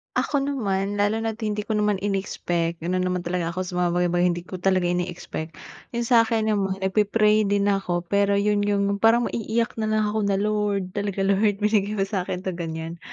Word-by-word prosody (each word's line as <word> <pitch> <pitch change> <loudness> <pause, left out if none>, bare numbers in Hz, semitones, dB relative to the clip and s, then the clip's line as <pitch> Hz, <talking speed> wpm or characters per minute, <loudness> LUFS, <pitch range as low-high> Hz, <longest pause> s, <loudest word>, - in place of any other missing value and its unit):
Ako 285 -2 +1
naman, 205 -7 -1
lalo 215 +2 +1
na't 225 0 -3
hindi 210 -1 -2
ko 220 - -5
naman 210 -1 +2
inexpect 175 -4 -2
ganon 185 +2 0
naman 180 -1 -2
talaga 175 -1 -2
ako 185 - -1
sa 180 - -7
mga 175 -1 +2
bagay 175 0 +2
bagay 175 0 +2
hindi 175 -1 -2
ko 185 0 -8
talaga 185 0 +2
ine-expect. 175 -2 -3 0.4
Yun 235 - 0
sa'kin 230 -2 +3
naman 195 -2 0
nagpi-pray 210 +2 +3
din 200 0 +2
ako 180 -3 -1
pero 200 0 +3
yun 205 +1 +2
yung 200 0 +1
parang 230 +2 +4
maiiyak 230 +1 -1
na 215 - 0
lang 215 0 +1
ako 220 - -1
na, 195 - +2
"Lord, 205 -2 0
talaga 200 -1 -2
Lord 200 +1 +2
binigay 210 -1 +2
mo 195 - +1
sakin 185 -2 -3
'to," 185 - -2
ganyan. 165 -1 -5
200 Hz, 195 wpm, -24 LUFS, 180-210 Hz, 0.4 s, parang